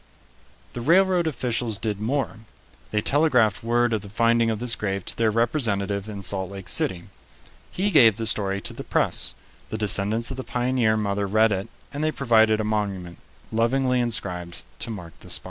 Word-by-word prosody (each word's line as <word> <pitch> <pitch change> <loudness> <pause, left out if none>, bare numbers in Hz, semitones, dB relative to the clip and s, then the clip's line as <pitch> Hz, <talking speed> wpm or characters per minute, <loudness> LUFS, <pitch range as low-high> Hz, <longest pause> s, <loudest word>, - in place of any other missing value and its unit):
The 120 - -5
railroad 180 +4 +3
officials 120 -6 -1
did 105 -2 -3
more. 125 +1 -1 0.5
They 105 - 0
telegraphed 125 -10 +3
word 120 0 +2
of 110 - 0
the 100 - -10
finding 115 +2 +2
of 110 - -1
this 120 +1 0
grave 100 -3 -3
to - - -3
their 115 -1 +2
representative 110 -4 0
in 100 -2 -7
Salt 95 0 -1
Lake 100 -1 -7
City. 85 -2 +1 0.7
He 200 +3 -1
gave 115 - +7
the 115 +1 -3
story 100 -2 -1
to - - -5
the - - -7
press; - - 0 0.3
the 110 - -3
descendants 105 +3 0
of 130 - -5
the 130 - -4
pioneer 125 -3 +1
mother 100 -1 -1
read 110 +2 +3
it, 100 +1 -2 0.3
and 145 +2 -3
they 155 - +2
provided 110 -6 +3
a - - 0
monument, 100 -5 -3 0.3
lovingly 125 +3 +1
inscribed, 90 -7 -3 0.2
to - - -5
mark 90 -7 -7
the - - -13
spot. - - -1
110 Hz, 180 wpm, -24 LUFS, 100-120 Hz, 0.7 s, gave